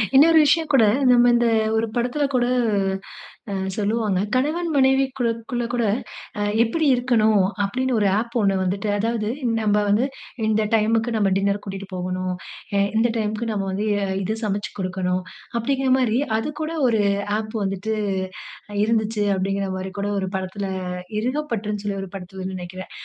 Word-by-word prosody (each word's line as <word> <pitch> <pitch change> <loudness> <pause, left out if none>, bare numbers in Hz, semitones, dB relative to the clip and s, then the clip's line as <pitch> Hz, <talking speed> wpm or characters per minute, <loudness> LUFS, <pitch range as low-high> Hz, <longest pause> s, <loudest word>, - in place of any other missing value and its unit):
இன்னொரு 320 +4 +7
விஷயம் 305 +2 +2
கூட 260 -4 +6 0.3
நம்ம 245 0 +6
இந்த 240 0 +3 0.3
ஒரு 225 +1 +1
படத்ல 245 +5 0
கூட 245 -1 +3 1.1
அ - - -2 0.2
சொல்லுவாங்க. 210 -2 0 0.2
"கணவன், 310 +7 0
மனைவிக்கூட 265 -2 +3 0.2
குள்ளகூட, 240 0 -1 0.6
அ - - -1 0.2
எப்டி 310 +8 0
இருக்கணும்?" 220 -5 +3 0.2
அப்டினு 255 +6 -1
ஒரு 205 - +3
ஆப் 235 +2 -5
ஒண்ணு 195 -1 +2
வந்துட்டு 200 +3 -1
அதாவது 225 0 -1 0.3
நம்ம 210 -1 +2
வந்து 210 +5 +3 0.4
இந்த 220 0 +2
டைம்க்கு 225 +2 +2
நம்ம 200 -2 +2
டின்னர் 200 +1 0
கூட்டிட்டு 195 0 -6
போகனும். 185 0 -2 0.4
எ - - +4 0.2
இந்த 235 +2 +3
டைம்க்கு 215 +1 -1
நம்ம 205 -2 -1
வந்து 200 +3 -2
எ 200 - 0 0.2
இத 215 +4 -1
சமச்சு 205 -1 -2
குடுக்கனும். 185 -1 -1 0.4
அப்டிங்கிற 265 +2 0
மாரி 240 -3 +2 0.2
அதுக்கூட 300 +6 -3 0.2
ஒரு 225 -3 +2 0.4
ஆப் 215 +1 -5
வந்துட்டு 195 +3 -2 0.9
இருந்துச்சு. 220 -1 +1
அப்டிங்கிற 195 +1 -1
மாரி 190 0 -5
கூட 200 +1 -1
ஒரு 190 -1 -2
படத்ல 190 +2 -3 0.5
இறுகப்பற்றுன்னு 230 -5 -2
சொல்லி 200 -1 -2
ஒரு 195 - -7
படத்லனு 190 0 -6
நெனைக்கிறேன். 185 +1 -8
215 Hz, 145 wpm, -23 LUFS, 195-245 Hz, 1.1 s, இன்னொரு